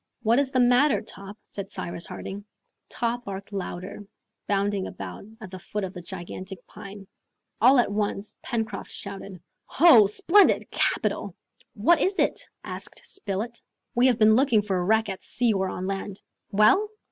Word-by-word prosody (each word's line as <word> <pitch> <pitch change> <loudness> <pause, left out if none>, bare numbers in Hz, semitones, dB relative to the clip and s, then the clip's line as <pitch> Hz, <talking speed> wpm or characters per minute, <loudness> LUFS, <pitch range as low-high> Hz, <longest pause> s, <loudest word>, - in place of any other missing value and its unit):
"What 230 +3 +4
is 280 -2 +1
the 260 - 0
matter, 250 +4 +4
Top?" 200 0 -11
said 200 0 -7
Cyrus 170 -3 -5
Harding. 200 +1 -7 0.5
Top 240 +1 -2
barked 195 +1 -7
louder, 190 +1 -5 0.4
bounding 200 -1 0
about 95 - -8
at 215 -5 -10
the 185 - -7
foot 210 +3 -5
of 190 +1 -5
a 180 - -6
gigantic 185 +1 -8
pine. 200 -1 -11 0.6
All 255 +4 +7
at 240 -4 +3
once 205 0 -2
Pencroft 225 -4 -4
shouted, 200 -2 -7 0.3
"Ho, 270 - +6
splendid! 380 - +3
capital!" - - 0 0.4
"What 285 +12 +3
is 385 +1 +1
it?" - - +1 0.2
asked - - -7
Spilett. 230 - -5 0.3
"We 245 +2 +4
have 245 -3 +3
been 215 -1 +6
looking 240 -5 +3
for 195 -2 -1
a 180 - 0
wreck 220 +3 +2
at 190 -2 -6
sea 240 -2 +1
or 190 -1 0
on 185 - -5
land!" 195 0 -5 0.3
"Well?" 370 - +4
205 Hz, 160 wpm, -26 LUFS, 195-240 Hz, 0.6 s, All